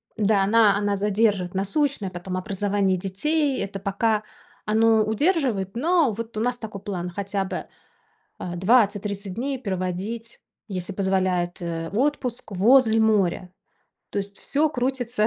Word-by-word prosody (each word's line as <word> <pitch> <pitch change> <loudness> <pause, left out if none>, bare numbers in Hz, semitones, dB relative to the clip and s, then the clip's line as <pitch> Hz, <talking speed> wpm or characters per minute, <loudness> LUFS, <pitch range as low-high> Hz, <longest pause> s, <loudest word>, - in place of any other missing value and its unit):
Да, 210 -2 +3
она 210 0 +5
она 205 0 0
задержит: 205 -2 +1
насущное, 200 +3 0
потом 185 +1 -5
образование 195 0 0
детей- 275 - 0
это 195 0 -5
пока 210 +2 0 0.4
оно 220 +1 +4
удерживает. 220 - 0
Но 320 +1 +3
вот 225 +1 -6
у - - 0
нас 245 +2 0
такой 215 -4 -7
план 180 -3 -4
хотя 195 +2 -2
бы, - - -4 0.7
э, 175 -1 -5
20-30 200 -1 +1
дней 265 +4 -2
проводить, 200 +2 -4 0.3
если 185 -1 -4
позволяет, 185 -2 0
э, 165 -1 -3
в 205 - -2
отпуск 255 -5 -1
возле 225 +3 +5
моря. 195 -4 +1 0.6
То - - -2
есть 200 0 -5
всё 300 +2 +1
крутится 245 -5 0
205 Hz, 140 wpm, -24 LUFS, 190-230 Hz, 0.7 s, она